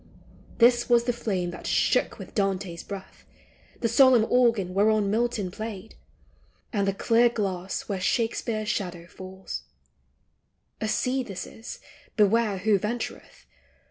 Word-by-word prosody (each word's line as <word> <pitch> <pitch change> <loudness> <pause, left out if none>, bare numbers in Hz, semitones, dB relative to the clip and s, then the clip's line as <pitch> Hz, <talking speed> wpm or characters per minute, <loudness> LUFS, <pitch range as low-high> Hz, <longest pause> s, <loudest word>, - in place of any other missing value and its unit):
This 240 +1 +4
was 240 -1 +5
the 245 - 0
flame 195 -7 -2
that 175 - -8
shook - - +2
with - - -10
Dante's 195 -4 -1
breath, 195 -2 -9 0.6
The 235 - +2
solemn 255 -1 +6
organ 230 -7 +3
whereon 205 0 +3
Milton 220 -4 0
played, 215 0 -7 0.8
And 200 -2 +1
the 195 - +1
clear 235 +3 +4
glass 195 -5 -3
where 195 -3 -3
Shakespeare's 225 0 -1
shadow 180 -5 -3
falls: 190 +2 -8 1.2
A 220 - 0
sea 250 +4 0
this 200 -7 -6
is, 230 - -9 0.2
— - - -27
beware 210 0 +3
who 205 +1 +2
ventureth 225 +4 -5
215 Hz, 135 wpm, -26 LUFS, 190-235 Hz, 1.2 s, solemn